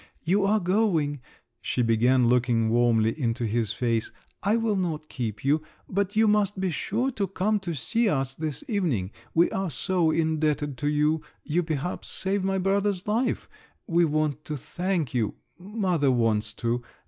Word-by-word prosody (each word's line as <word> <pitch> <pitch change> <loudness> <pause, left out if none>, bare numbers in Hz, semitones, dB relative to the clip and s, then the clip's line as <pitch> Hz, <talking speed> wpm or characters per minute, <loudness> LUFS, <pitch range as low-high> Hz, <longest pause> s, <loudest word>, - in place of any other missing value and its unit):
"You 195 +4 +2
are 215 +2 +3
going," 175 - +1 0.4
she 125 - 0
began, 120 +2 +3
looking 120 -2 +2
warmly 115 -2 +3
into 120 0 0
his 110 -1 0
face; 115 -2 -1 0.3
"I 205 +3 +2
will 225 -2 +1
not 160 -5 -2
keep 110 -3 -4
you, 150 +3 +3 0.3
but 200 +1 -1
you 220 0 +4
must 205 -2 +2
be 190 -1 0
sure 235 - -1
to 200 -5 -2
come 200 +3 0
to 175 -4 -4
see 215 - +1
us 135 -5 0
this 155 - -4
evening: 160 - -1 0.2
we 170 +1 +4
are 190 -1 -1
so 175 0 +1
indebted 155 -3 0
to 145 - -1
you—you, 150 +2 0
perhaps, 160 0 -3
saved 195 0 0
my 195 0 0
brother's 195 0 0
life, 230 +4 0 0.4
we 170 0 +3
want 155 -1 0
to 150 - -4
thank 175 -1 -2
you—mother 175 - -1
wants 110 -3 +1
to. 120 +2 -1
160 Hz, 160 wpm, -26 LUFS, 125-195 Hz, 0.4 s, you